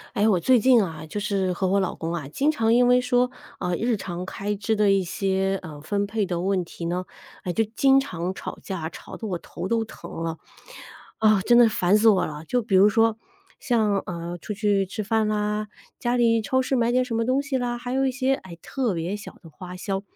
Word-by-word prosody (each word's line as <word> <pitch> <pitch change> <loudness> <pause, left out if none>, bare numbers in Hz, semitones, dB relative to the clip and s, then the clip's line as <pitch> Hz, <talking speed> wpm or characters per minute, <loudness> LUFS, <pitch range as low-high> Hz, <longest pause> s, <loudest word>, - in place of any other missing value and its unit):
哎， 205 - +2
我 190 -4 +3
最 255 +9 +4
近 250 -1 +6
啊， 160 -5 -4
就 160 +6 -5
是 200 -3 0
和 185 +2 -1
我 195 +2 +2
老 185 - -1
公 165 +1 -4
啊， 165 -5 -4
经 275 - +1
常 225 -7 +2
因 245 +1 +5
为 250 0 +5
说， 250 0 +2 0.3
呃， 180 -1 -1
日 235 +2 0
常 180 -2 -5
开 200 +2 -3
支 205 +2 -1
的 210 -1 +3
一 195 -1 +3
些， 195 +1 -1
呃， 150 -4 -9
分 200 +6 -1
配 210 0 -1
的 175 -2 -2
问 190 0 0
题 170 0 -8
呢， 175 +2 -1 0.4
诶， 180 - -2
就 225 +6 +1
经 270 0 +5
常 180 -8 -3
吵 - - -7
架， 185 -5 -4
吵 - - -10
得 220 - -5
我 180 - -2
头 180 - -7
都 230 +2 +1
疼 220 - -11
了。 165 -1 -3 0.8
啊， 215 -2 +4
真 240 +5 +4
的 240 -1 +8
烦 200 -2 +3
死 220 +2 +3
我 200 -4 +5
了。 150 +1 -7
就 245 +8 0
比 210 -3 0
如 195 - +7
说 225 +1 +3 0.4
像， 220 -5 +1
呃， 170 0 -5
出 210 - -5
去 200 -1 +1
吃 210 +3 -5
饭 220 +1 +1
啦， 210 0 -1 0.3
家 240 +1 0
里 230 -2 +3
超 260 +4 +1
市 260 +1 0
买 235 0 +2
点 255 0 +3
什 250 - -5
么 230 0 0
东 260 +3 +2
西 280 -2 -2
啦， 245 -1 -2
还 245 +1 -6
有 270 +1 +1
一 265 - +1
些， 265 +1 +1
哎， 180 -9 -11
特 255 -6 -1
别 175 +4 -3
小 205 - -10
的 165 - -12
花 180 +3 -9
销。 195 +1 -3
205 Hz, 255 characters per minute, -24 LUFS, 185-235 Hz, 0.8 s, 的